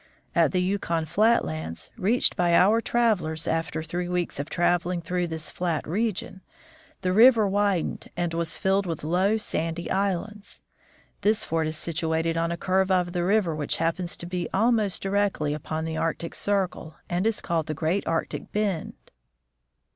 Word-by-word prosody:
At - - +3
the 180 -1 +1
Yukon 175 -4 -1
flat 215 +9 +3
lands, 80 +1 -5
reached 225 +3 +2
by 175 -1 +3
our 210 +6 +5
travelers 180 -11 0
after 160 -1 -1
three 175 +2 -3
weeks 180 -5 -2
of 145 +3 -4
traveling 175 +1 +1
through 175 +1 -2
this 160 -2 -6
flat 170 -4 -2
region, 205 0 -2 0.6
the 185 -1 0
river 225 0 +6
widened 200 -3 0
and 175 -1 -1
was 165 0 -1
filled 195 0 +1
with 165 -3 -4
low, 185 +7 +2
sandy 165 -4 -3
islands. 200 +2 -2 0.6
The 215 +2 +4
fort 165 -7 -1
is 155 0 -3
situated 165 0 -1
on 165 0 0
a 170 - -2
curve 190 +1 +1
of 180 -2 +1
the 175 -1 0
river 190 -3 +2
which 150 -1 -1
happens 170 +2 -1
to - - -6
be 175 0 -3
almost 215 -1 +2
directly 195 -7 0
upon 155 +1 -4
the 160 0 -3
Arctic 165 +1 -2
circle, 190 -5 -1
and 180 +4 0
is 225 -2 0
called 165 -3 -1
the 155 - -3
Great 165 +6 -1
Arctic 165 0 -2
bend. 205 -6 -1
175 Hz, 165 wpm, -26 LUFS, 165-200 Hz, 0.6 s, river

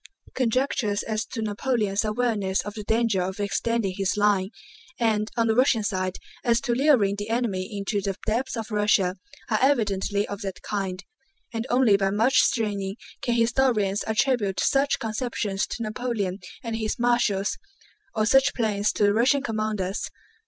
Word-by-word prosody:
Conjectures 240 -4 0
as 220 0 -2
to 225 -3 -4
Napoleon's 210 -1 0
awareness 215 -3 0
of 205 - -7
the 210 -1 -6
danger 220 -2 +1
of 190 +2 -3
extending 205 0 0
his 195 0 0
line, 200 -2 +2 0.5
and 220 -2 +1
(on 230 - +3
the 225 - +2
Russian 245 -2 +3
side) 185 -3 -2 0.3
as 235 -2 +3
to 240 - 0
luring 240 -7 +3
the 205 +1 -5
enemy 220 -6 -1
into 200 0 -2
the 195 -1 -3
depths 240 +3 -1
of 225 0 -5
Russia, 205 -3 +2 0.3
are 215 - +3
evidently 205 -6 +1
of 200 +1 -6
that 195 -3 -6
kind, 195 -2 -3 0.5
and 225 +2 -3
only 245 -5 +4
by 195 -1 +1
much 220 +6 +3
straining 200 -4 0 0.3
can 240 - 0
historians 230 -4 +2
attribute 220 -3 +1
such 275 +1 +2
conceptions 215 -3 -2
to 230 - -5
Napoleon 215 -4 -2 0.2
and 230 -2 -3
his 220 -1 -2
marshals, 235 -5 +1 0.6
or 215 - +2
such 270 +4 +4
plans 210 -3 +1
to - - 0
the 205 0 +4
Russian 255 +5 +3
commanders. 215 -5 -2
215 Hz, 160 wpm, -25 LUFS, 200-235 Hz, 0.6 s, only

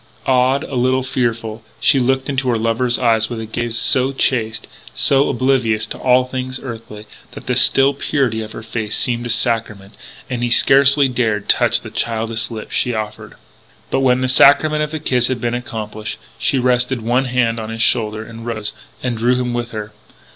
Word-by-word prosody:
Awed, 130 +1 +2
a - - -9
little 130 +1 +1
fearful, 115 -3 -2 0.2
she 140 - +3
looked 130 +1 0
into 135 -2 -1
her 120 - +1
lover's 115 +2 0
eyes 115 -3 +1
with 120 -2 -5
a 110 - -5
gaze 120 +1 -3
so 130 +2 +3
chaste, 110 -4 -1 0.3
so 135 0 +3
oblivious 125 -4 +1
to - - -7
all 125 0 +3
things 130 0 -5
earthly, 115 -4 -9 0.3
that - - -10
the - - -1
still 135 +1 +5
purity 135 -5 -1
of 110 0 -8
her 110 - -9
face 110 -1 -4
seemed 120 -1 -1
a - - -7
sacrament, 110 -4 -1 0.3
and 125 -2 -4
he 120 - 0
scarcely 140 +3 +5
dared 115 -5 -1
touch - - +2
the - - -10
childish 115 0 -2
lips 110 -2 -8
she 125 -2 0
offered. 110 -1 -6 0.6
But - - +1
when 130 -1 +2
the 130 - 0
sacrament 150 +4 +4
of 150 - -1
the 155 0 -5
kiss 125 -5 +2
had 130 -2 -2
been 120 0 -2
accomplished, 110 -3 -5 0.2
she 135 - +1
rested 125 0 +1
one 125 +4 +1
hand 120 -2 0
on 110 0 -6
his 115 0 -1
shoulder 110 -1 0
and 115 0 -10
rose, 110 -3 -4 0.3
and 125 -2 -1
drew 120 +3 +1
him 125 -1 -2
with 120 -1 -3
her. 105 -2 -7
120 Hz, 190 wpm, -18 LUFS, 110-130 Hz, 0.6 s, still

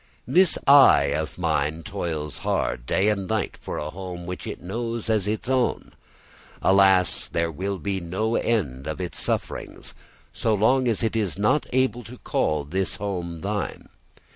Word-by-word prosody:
This 175 +7 +4
"I" 135 - +7
of 80 -1 -3
mine 80 +3 -1
toils 80 -7 -4
hard, - - -1
day 95 +2 +2
and 100 -3 -1
night, 110 -1 -1
for - - -6
a 75 +1 -4
home 90 -1 -7
which 90 +1 -6
it - - -5
knows 115 +4 -3
as 105 -3 +1
its 110 +2 -2
own. 130 -1 0 0.7
Alas, 95 -2 +4
there 85 0 -1
will 95 +5 -3
be 95 +3 -2
no 95 +6 -2
end 70 - -1
of 80 +2 -4
its 90 -1 -4
sufferings - - -4 0.4
so 110 -1 +1
long 125 +5 +3
as 115 -1 0
it 115 0 0
is 100 -5 0
not 105 +9 +2
able 130 -1 +1
to 125 +2 -10
call 75 -9 0
this 95 +7 -2
home 90 -5 -4
thine. 100 +1 -4
95 Hz, 165 wpm, -24 LUFS, 85-110 Hz, 0.7 s, I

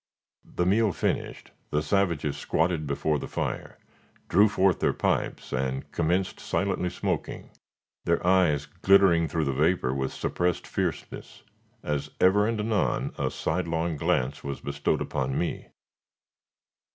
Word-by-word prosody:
The 90 - +1
meal 105 +3 +3
finished, - - -3 0.2
the 75 0 0
savages 80 -5 0
squatted 80 -2 0
before 75 +1 0
the - - -6
fire, - - -4 0.5
drew 105 +4 +5
forth 95 -2 +2
their - - +2
pipes - - -1
and 65 +1 -2
commenced 90 +3 0
silently 95 -2 -1
smoking, 90 - -4 0.5
their 85 +1 +1
eyes 90 -6 +3
glittering 95 -4 +4
through 80 +1 -1
the 70 - 0
vapor 75 -2 +1
with 65 0 -2
suppressed 90 -1 -1
fierceness, - - -4 0.4
as 75 0 -2
ever 105 +3 +4
and 115 -1 -1
anon 105 -2 0
a - - +1
sidelong 85 -1 -1
glance 70 -1 0
was 70 -1 -4
bestowed 70 0 -1
upon 65 0 -2
me. 85 - -2
85 Hz, 130 wpm, -27 LUFS, 75-95 Hz, 0.5 s, drew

